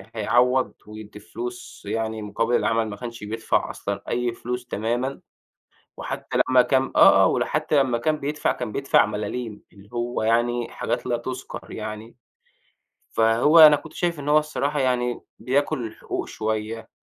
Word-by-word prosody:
هيعوِّض 125 +4 +2
ويدِّي 105 -1 -10
فلوس 120 +6 -8
يعني 110 +1 -3
مقابِل 115 +3 -1
العمل، 115 -1 +1
ما 100 - -6
كانش 115 +1 -8
بيدفع 110 +2 -1
أصلًا 100 0 -4
أي 120 0 -1
فلوس 125 +1 -5
تمامًا. 120 +5 -2 0.8
وحتى - - -4
لمَّا 130 -1 +6
كان 130 +1 +1
آه - - +7
آه، - - +6
وحتى 150 - +1
لمَّا 125 -3 0
كان 155 +6 0
بيدفع، 150 +2 -1
كان 125 -4 -4
بيدفع 135 0 +3
ملاليم، 105 +1 -5
اللي 100 0 -17
هو 120 -1 -2
يعني 120 +1 +1
حاجات - - -3
لا 120 -1 0
تُذكَر 125 +2 -7
يعني. 110 +1 -7 1.0
فهو 115 +8 +4
أنا 155 -2 +10
كنت 155 +2 -11
شايِف 170 -3 -2
إن 145 - -5
هو 150 +1 +6
الصراحة 150 -1 -1
يعني 125 -2 0 0.2
بياكُل 135 -1 0
الحقوق 110 - -5
شوية، 110 +1 -4
120 Hz, 150 wpm, -24 LUFS, 110-130 Hz, 1.0 s, أنا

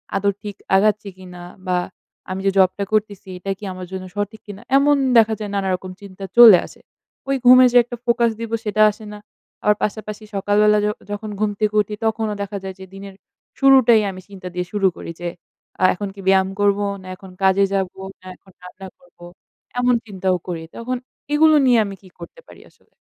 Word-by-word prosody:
আদৌ 200 +1 +1
ঠিক 205 -2 -7 0.2
আগাচ্ছি 210 +1 +2
কিনা? 180 -1 -11 0.2
বা 180 -1 +1 0.5
আমি 185 +1 -4
যে 195 - +3
জবটা 190 +1 +3
করতেছি 210 -3 -1
এটা 195 +2 -5
কি 210 - -17
আমার 185 0 -8
জন্য 190 -1 -6
সঠিক 205 +1 -4
কিনা? 205 0 -9 0.2
এমন 290 +1 +4 0.2
দেখা 225 -1 +5
যায় 210 -1 -5
নানারকম 190 -1 -2
চিন্তা 195 -1 -11
চলে 230 -6 +10
আসে। - - -16 0.5
ওই 275 - +2
ঘুমের 255 +1 +8
যে - - +6
একটা 240 +1 -8
ফোকাস 235 -1 +2
দিবো 230 0 -3
সেটা 210 0 0
আসে 215 +1 -13
না। - - -8 0.5
আবার 210 - +3
পাশাপাশি 215 0 -4
সকালবেলা 210 +2 +3
য - - +1 0.2
যখন 205 +1 -5
ঘুম 215 -1 0
থেকে 215 -1 0
উঠি 210 +1 -6
তখনও 220 -1 -1
দেখা 200 0 -4
যায় 190 -1 -6
যে 190 - -9
দিনের 195 0 -10 0.5
শুরুটাই 260 -5 +6
আমি 185 0 -10
চিন্তা 190 -2 -10
দিয়ে 180 0 -3
শুরু 205 -2 +2
করি। - - -7
যে 175 - -2 0.5
আ - - +1
এখন 205 +2 -5
কি 195 - -10
ব্যায়াম 190 0 +3
করবো? 205 0 +2 0.2
না 185 - -13
এখন 190 0 -14
কাজে 190 +1 +4
যাবো? 190 -1 -2 0.2
না 185 - -14
এখন 190 - -22
রান্না 185 +1 -11
করবো? 265 -10 -17 0.5
এমন 245 0 +3
চিন্তাও 190 -3 -1
করি 170 -2 -5
তখন। 250 +2 -4 0.4
এগুলো 310 +1 +5
নিয়ে 245 -3 +4
আমি 200 -1 -7
কি 190 - -17
করতে 170 - -11
পারি - - -15
আসলে? - - -33
205 Hz, 195 wpm, -20 LUFS, 190-220 Hz, 0.5 s, চলে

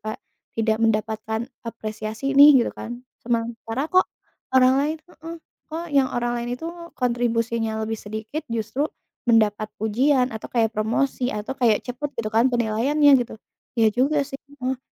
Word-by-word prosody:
Kak, - - -32 0.4
tidak 220 -1 +1
mendapatkan 220 0 0 0.2
apresiasi 220 +3 -4
nih 280 -2 +8
gitu - - -3
kan. 240 +2 -8 0.2
Sementara 230 +3 -2
kok 370 0 +4 0.5
orang 255 0 +6
lain 305 +3 0
heeh, 335 -1 -10 0.3
kok 325 +2 -4
yang 270 -2 +4
orang 240 0 -1
lain 240 +1 -3
itu 325 - -7 0.3
kontribusinya 235 -2 0
lebih 220 0 -3
sedikit, 220 +8 -5
justru 230 +6 -1 0.4
mendapat 215 -2 +3
pujian 250 +5 +2
atau 220 - -7
kayak 225 -2 +1
promosi 245 +4 0
atau 210 +3 -4
kayak 235 -5 +2
cepat 260 +4 -4
gitu 215 -1 -2
kan 230 +3 +5
penilaiannya 245 +5 +3
gitu. 235 - -6 0.4
Iya 220 -2 +4
juga 280 +4 +2
sih, 270 0 -8 0.2
heeh. 260 0 -1
235 Hz, 150 wpm, -23 LUFS, 220-270 Hz, 0.5 s, nih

